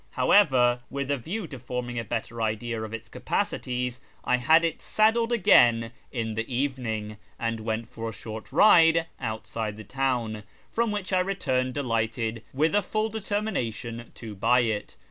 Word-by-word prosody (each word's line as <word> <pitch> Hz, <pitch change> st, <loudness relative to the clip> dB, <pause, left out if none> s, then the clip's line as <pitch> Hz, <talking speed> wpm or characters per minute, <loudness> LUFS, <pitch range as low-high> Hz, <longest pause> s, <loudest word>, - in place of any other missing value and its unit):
However, 125 Hz, -11 st, +4 dB
with 140 Hz, 0 st, -3 dB
a 140 Hz, -, +1 dB
view 185 Hz, -, -4 dB
to 135 Hz, -5 st, -9 dB
forming 125 Hz, 0 st, -4 dB
a -, -, -3 dB
better 115 Hz, 0 st, -4 dB
idea 110 Hz, +1 st, -2 dB
of 110 Hz, -1 st, -5 dB
its 115 Hz, 0 st, -6 dB
capacities, 125 Hz, +2 st, -2 dB, 0.2 s
I 125 Hz, -, +2 dB
had 160 Hz, +7 st, +5 dB
it 165 Hz, -, -2 dB
saddled 225 Hz, +2 st, +2 dB
again 120 Hz, -, +5 dB, 0.2 s
in 115 Hz, -3 st, -2 dB
the 115 Hz, +4 st, -4 dB
evening 120 Hz, -5 st, -2 dB, 0.2 s
and 115 Hz, -1 st, -2 dB
went 110 Hz, +1 st, -3 dB
for 115 Hz, 0 st, -5 dB
a -, -, -7 dB
short 110 Hz, +3 st, -8 dB
ride 165 Hz, 0 st, +6 dB
outside 110 Hz, -2 st, -4 dB
the 110 Hz, -, -8 dB
town, 120 Hz, -3 st, -1 dB, 0.3 s
from 235 Hz, 0 st, +1 dB
which 205 Hz, -2 st, -3 dB
I 185 Hz, -, +4 dB
returned 130 Hz, -10 st, 0 dB
delighted, 115 Hz, -3 st, -1 dB
with 155 Hz, +4 st, +1 dB
a 205 Hz, -, +4 dB
full 215 Hz, +2 st, -1 dB
determination 190 Hz, -, -3 dB
to 110 Hz, -3 st, -8 dB
buy 120 Hz, +5 st, +3 dB
it. 110 Hz, -3 st, -2 dB
125 Hz, 165 wpm, -27 LUFS, 115-160 Hz, 0.3 s, ride